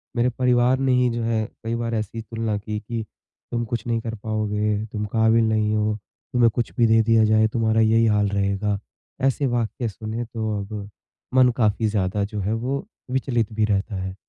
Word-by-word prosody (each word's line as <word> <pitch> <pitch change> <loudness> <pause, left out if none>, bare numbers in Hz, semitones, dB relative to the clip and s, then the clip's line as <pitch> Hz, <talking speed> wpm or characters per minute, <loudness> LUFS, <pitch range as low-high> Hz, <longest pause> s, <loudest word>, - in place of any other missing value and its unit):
मेरे 120 +1 +3
परिवार 125 +1 +2
ने 135 -1 +2
ही 125 -1 +3
जो 120 0 -2
है 115 -1 +1 0.2
कई 115 +1 -2
बार 115 0 -2
ऐसी 110 +1 -3
तुलना 115 -1 -2
की, 105 +1 -4
कि 115 +1 -4 0.5
तुम 120 -1 -1
कुछ 115 +1 -4
नहीं 115 -1 +1
कर 115 0 -4
पाओगे, 105 0 -1
तुम 105 0 -3
काबिल 110 +1 +3
नहीं 110 -1 +1
हो, 105 0 +1 0.4
तुम्हें 120 -2 +5
कुछ 120 - -1
भी 115 -1 +5
दे 110 0 +5
दिया 115 0 +4
जाए 110 0 +4
तुम्हारा 110 -1 +2
यही 115 +1 +4
हाल 105 -1 +3
रहेगा। 100 +1 0 0.5
ऐसे 135 +2 +1
वाक्य 120 0 -1
सुने 110 +3 -5
तो 110 -2 -3
अब 100 0 -6 0.5
मन 130 -1 +6
काफ़ी 110 -1 +2
ज़्यादा 100 -1 0
जो 105 +1 -4
है 100 +3 -1
वो 130 - -2 0.3
विचलित 120 -4 0
भी 110 0 +2
रहता 100 0 -1
है। 95 0 -5
110 Hz, 195 wpm, -23 LUFS, 105-115 Hz, 0.5 s, मन